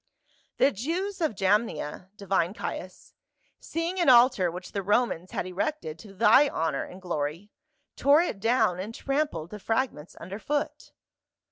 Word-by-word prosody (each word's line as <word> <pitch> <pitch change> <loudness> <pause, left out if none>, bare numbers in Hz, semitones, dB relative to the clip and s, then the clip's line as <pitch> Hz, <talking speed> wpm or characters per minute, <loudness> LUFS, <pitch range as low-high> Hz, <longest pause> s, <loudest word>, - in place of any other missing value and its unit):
"The 275 - +4
Jews 350 - -3
of 310 -9 0
Jamnia, 195 -4 0
divine 195 -1 0
Caius, - - -7 0.5
seeing 335 +3 -3
an 345 - +4
altar 240 -7 +6
which 180 +2 -8
the 200 - -2
Romans 195 -3 0
had - - -3
erected 185 - -3
to 210 - -12
thy 260 +7 +6
honor 160 -3 -1
and 180 - -11
glory, 170 +2 -4 0.4
tore 285 +3 +5
it 220 - -4
down 220 -4 +2
and 210 +5 -5
trampled 275 - -2
the 210 - -7
fragments 225 - -2
under 195 +3 -7
foot." 290 +4 -3
210 Hz, 145 wpm, -27 LUFS, 180-275 Hz, 0.5 s, altar